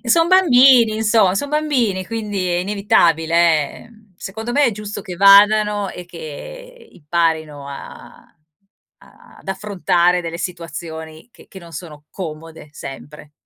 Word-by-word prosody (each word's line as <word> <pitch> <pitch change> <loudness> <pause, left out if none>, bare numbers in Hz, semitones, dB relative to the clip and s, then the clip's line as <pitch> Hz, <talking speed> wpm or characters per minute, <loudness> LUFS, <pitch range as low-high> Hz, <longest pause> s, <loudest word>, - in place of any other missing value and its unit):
Son 330 +8 +3
bambini, 260 -10 +5
insomma, 215 -4 +2
son 285 +8 -2
bambini! 250 -12 -1
Quindi 210 -5 -4
è 175 - 0
inevitabile, 170 -5 +2
ehm, 215 -4 -22
secondo 220 +6 -6
me 290 +3 +2
è 245 - +3
giusto 210 0 -7
che 180 -4 -8
vadano 205 +1 +5
e 180 -1 -10
che 465 - -11
imparino 155 -3 -2
a 140 - -12 0.7
a - - -20
ad - - -20
affrontare 180 -3 0
delle 170 0 -6
situazioni 160 0 -7
che - - -19
che 190 - -12
non 170 -1 -14
sono 150 -1 -10
comode 160 -3 -9
sempre. 145 +2 -11
190 Hz, 135 wpm, -19 LUFS, 165-220 Hz, 0.7 s, bambini